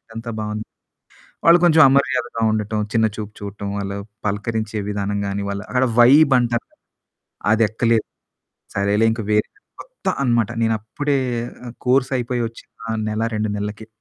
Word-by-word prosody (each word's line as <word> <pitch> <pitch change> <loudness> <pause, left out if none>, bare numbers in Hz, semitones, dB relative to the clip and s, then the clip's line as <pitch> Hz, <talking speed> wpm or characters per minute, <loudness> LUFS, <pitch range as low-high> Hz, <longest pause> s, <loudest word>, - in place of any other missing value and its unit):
అంతా 115 +1 -6
బావుంది. 105 +1 -4 0.8
వాళ్ళు 170 +1 +8
కొంచెం 160 -1 +6
అమర్యాదగా 130 -4 +1
ఉండటం, 110 0 -1
చిన్న 110 -1 +3
చూపు 105 -1 -6
చూడటం. 100 0 -6
వాళ్ళు 100 0 -3 0.3
పలకరించే 110 +1 -2
విధానం 100 0 -2
గాని 100 +1 -2
వాళ్ళు 100 0 -4
అక్కడ 130 0 +2
వైబ్ 135 +4 +7
అంటారు. 120 -1 -1 0.9
అదెక్కలేదు. 110 +1 +2 0.7
సరేలే 100 +3 +2
ఇంకా 115 -1 -3
వేరే 105 0 +2 0.3
కొత్త - - -12 0.2
అన్నమాట. 120 -3 +2
నేను 115 0 +2
అప్పుడే 140 +6 -1 0.5
ఆహ్, 120 - -8
కోర్సయిపోయి 125 -2 +1
వచ్చిన 115 0 -8
నెల 110 +1 -2
2 105 -1 -1
నెల్లకె. 105 +2 -5
110 Hz, 135 wpm, -21 LUFS, 105-120 Hz, 0.9 s, వాళ్ళు